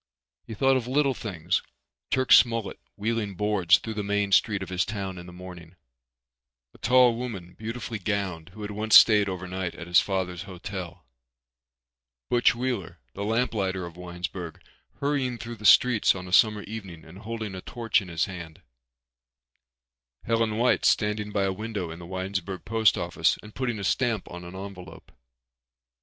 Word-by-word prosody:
He 110 - -6
thought 135 +4 +3
of 120 -2 -4
little 140 +1 +2
things—Turk 105 - -3
Smollet 115 -4 +5 0.2
wheeling 105 -1 -2
boards 100 -3 +3
through 110 - -6
the 105 - -3
main 100 0 0
street 100 0 +3
of - - -8
his 90 -1 +1
town 95 -4 -5
in 90 - -10
the - - -10
morning, 90 -1 -11 1.0
a - - -19
tall 125 0 +5
woman, 105 -8 -6
beautifully 110 +2 -5
gowned, 95 -5 -3
who 105 - -8
had 105 - -5
once 110 +1 +2
stayed 105 -3 +6
overnight 90 -1 -4
at - - -8
his 85 0 +5
father's 95 -2 -2
hotel, 90 -3 -7 1.3
Butch 120 0 +4
Wheeler 120 -7 -3 0.2
the 100 - -5
lamp 115 +3 0
lighter 95 -3 -1
of 85 -1 -10
Winesburg 90 -1 -6 0.4
hurrying 140 -4 -1
through 115 0 -7
the 105 - -10
streets 115 -1 +5
on 90 -1 -7
a 90 - -7
summer 105 -1 +5
evening 100 -7 -8
and 90 +4 -13
holding 110 -2 -5
a 95 - -6
torch 115 -1 0
in 95 - -10
his 85 -2 0
hand, 85 -5 -9 1.6
Helen 115 -1 0
White 120 +2 +2
standing 105 -1 +2
by 100 -1 0
a 95 -1 0
window 100 -4 -4
in 80 - -9
the 85 - -10
Winesburg 95 0 -4
post 110 -1 +3
office 85 -1 +1
and 105 0 -12
putting 125 -3 -2
a 100 - -5
stamp 115 0 0
on 90 0 -8
an 85 +1 -9
envelope. 95 -2 -10
100 Hz, 165 wpm, -26 LUFS, 90-115 Hz, 1.6 s, stayed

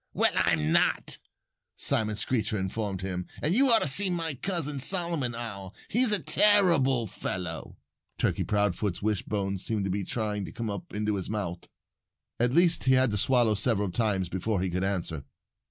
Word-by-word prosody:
"Well, - - +4
I'm 75 +1 +1
not!" - - +1 0.6
Simon 110 -1 0
Screecher 110 0 -1
informed 95 0 -3
him. 90 -1 -4
"And 155 - 0
you 265 +5 +4
ought 225 - +5
to - - +2
see 190 +8 +3
my 165 -3 -2
cousin, 150 -1 -2
Solomon 165 -5 +1
Owl. 100 -5 -7
He's 240 0 +2
a 210 - +4
terrible 165 - +3
fellow." 90 -4 -5 0.4
Turkey - - 0
Proudfoot's 105 -2 0
wishbone 100 -2 -1
seemed 105 +1 -2
to 95 - -1
be 100 +1 -1
trying 105 -1 -3
to - - -8
come 115 -2 -4
up 100 -3 -7
into 105 0 -1
his 95 - -4
month. 95 -5 -4 0.7
At 120 +1 +2
least, 170 +2 +3
he 130 - +5
had 130 -2 +4
to 105 - -1
swallow 120 -2 +3
several 105 -2 0
times 100 -4 0
before 95 +3 -2
he 95 - -2
could 90 +2 -1
answer. 85 -6 -2
110 Hz, 170 wpm, -28 LUFS, 95-135 Hz, 0.7 s, ought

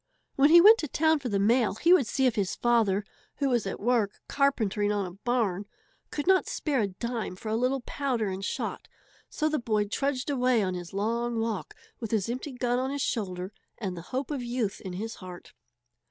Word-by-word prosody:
When 280 +2 +5
he 340 +2 +9
went 435 +5 +8
to 305 - -2
town 315 +2 +2
for 260 -3 -4
the 200 - +1
mail 225 +2 +3
he 335 +11 +4
would 280 -11 +4
see 265 +4 +1
if 250 - +3
his 200 -5 -1
father, 220 -4 +2 0.3
who 280 -2 0
was 240 -5 +1
at - - -4
work 225 -3 +1
carpentering 220 -7 +1
on 205 -2 0
a 180 - -6
barn, 205 -1 -1 0.4
could 290 - -4
not 380 +1 +4
spare 285 -6 -1
a 205 - +1
dime 225 +1 -4
for 215 +4 -7
a 220 - 0
little 255 +3 +1
powder 245 -4 -2
and 190 0 -4
shot. - - -4 0.4
So 310 - -1
the 310 0 0
boy 215 -3 0
trudged 275 +5 -1
away 250 -4 +2
on 185 -1 -1
his 175 -1 -6
long 230 +4 -1
walk, 225 -3 -3 0.2
with 225 - -5
his 220 -1 0
empty 255 +4 -4
gun 245 0 0
on 260 +1 -1
his 280 0 -2
shoulder 185 -3 -3 0.2
and 190 -5 -4
the 170 - -7
hope 265 +3 -3
of 280 -3 -2
youth 240 -4 -2
in 185 - -6
his 220 +5 -5
heart. 180 -2 -11
235 Hz, 210 wpm, -28 LUFS, 205-265 Hz, 0.4 s, he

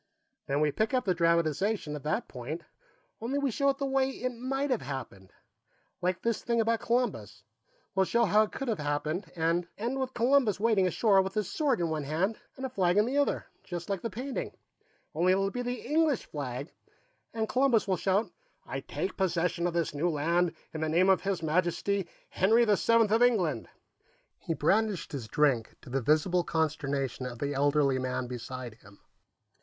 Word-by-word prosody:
Then 140 +2 0
we 150 -1 +3
pick 220 - 0
up 250 - +1
the 185 - +2
dramatization 170 +1 +1
at 150 - -6
that 150 +2 -1
point, 140 +7 -6 0.6
only 250 +5 -1
we 280 -2 0
show 280 +5 +2
it 275 - 0
the 275 - -2
way 270 0 +2
it 255 -1 -3
might 270 +4 -2
have 250 - +1
happened. 130 -9 -7 0.7
Like 180 0 -1
this 230 -2 0
thing 235 -1 0
about 225 0 +2
Columbus; 115 - -1 0.5
we'll 190 -1 +2
show 235 0 +3
how 210 +2 +4
it 215 - 0
could 270 - -5
have 220 -6 -1
happened, 150 +5 -2
and 170 +1 +1
end 240 +5 -2
with 260 -1 -3
Columbus 245 -3 +3
wading 210 -4 +3
ashore 195 +1 +4
with 190 +2 -4
his 210 -3 -1
sword 285 - +1
in 170 -2 0
one 155 -2 -2
hand 180 +9 -1 0.2
and 265 - -4
a - - -2
flag 185 -6 +1
in 210 - +5
the 255 +4 -2
other, 285 - 0 0.2
just 175 +1 -5
like 195 -3 -2
the 230 - -3
painting, 250 +6 -5 0.6
only 175 +4 +3
it'll 195 +1 +1
be 245 - -3
the 245 0 -4
English 300 -1 +2
flag, 140 0 -5 0.6
and 220 -1 -2
Columbus 255 -4 +2
will 190 - +2
shout: 195 +4 0 0.3
'I - - -4
take 390 - -4
possession 175 -1 0
of 170 - -3
this 170 -3 0
new 155 +5 0
land 170 +3 +1 0.2
in 160 - -4
the 160 - 0
name 180 +4 +4
of 190 -3 +4
His 190 -3 -2
Majesty, 175 +4 0 0.2
Henry 225 +6 +4
the 210 -2 +4
Seventh 230 0 +3
of 225 +2 +3
England!'" 220 -10 +2 0.7
He 165 -4 -3
brandished 200 +4 +1
his 130 -6 -5
drink, 130 -4 +1
to - - -11
the 135 +1 0
visible 155 +7 +2
consternation 140 -6 -1
of 120 -1 -7
the 140 +4 -2
elderly 140 -1 +2
man 130 0 -2
beside 125 0 -6
him. 100 0 -17
185 Hz, 190 wpm, -29 LUFS, 150-230 Hz, 0.7 s, in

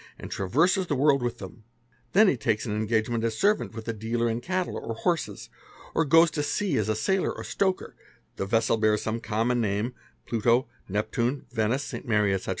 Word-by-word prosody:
and - - -9
traverses 165 - +2
the 145 - 0
worl 140 +1 +4
with 120 -1 -2
them; 100 +4 -10 0.5
then 210 +3 +6
he 185 - +3
takes 110 -2 -1
an 105 -3 -2
engagement 110 +1 0
as 115 -1 -1
servant 205 - +1
with 115 0 -7
a 115 - -1
dealer 115 +2 -2
11 115 0 -1
cattle 185 +5 -2
or 115 - -4
horses, 170 +8 -2 0.5
or 165 - +3
goes 165 +3 +6
to 150 - -2
sea 150 +3 -1
as 110 -3 0
a 110 - +1
sailor 185 - +1
or - - -7
stoker, 190 -2 -1 0.4
the 95 - -3
vessel 115 +2 +2
bear 110 -1 +3
some 110 +2 -3
common 115 +2 0
name 105 +3 -1 0.3
(Pluto, 115 +2 +2 0.2
Neptune, 115 +6 -1
Venice, 115 +4 0
St. - - -7
Mary, 105 -3 +2
ete. 95 -1 -3
115 Hz, 195 wpm, -27 LUFS, 110-145 Hz, 0.5 s, then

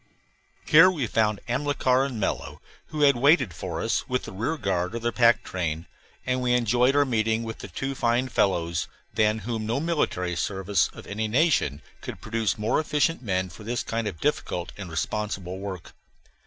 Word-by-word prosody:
Here 165 +4 +8
we 155 -9 -1
found 110 -2 +1
Amilcar 130 0 +1
and 130 -5 -4
Mello, 95 - -2 0.3
who 155 -1 -4
had 140 -2 +6
waited 130 - +4
for - - -5
us - - -1
with 125 0 0
the - - -7
rear 115 +12 -2
guard 95 -3 -1
of 115 - -5
their 120 - +1
pack 120 -1 +4
train, 80 -3 -3 0.4
and 125 0 0
we 125 -1 +2
enjoyed 125 +3 +3
our 145 0 +5
meeting 110 -2 +1
with 110 -1 -6
the - - -7
two 135 +9 -4
fine 120 0 +1
fellows, 85 -7 0 0.3
than 110 0 +2
whom 110 -2 -3
no 115 +4 0
military 145 - -1
service 95 0 0
of - - -11
any 110 +2 -2
nation 110 - +2 0.2
could - - -7
produce 110 -3 -1
more 110 +2 +1
efficient 155 +1 +1
men 95 -5 -1
for 90 +4 -12
this 120 +3 -2
kind 115 -1 -2
of 90 -6 -5
difficult 85 +3 -1
and 100 -3 -7
responsible 95 +1 -3
work. 95 -3 -7
110 Hz, 180 wpm, -26 LUFS, 95-130 Hz, 0.4 s, Here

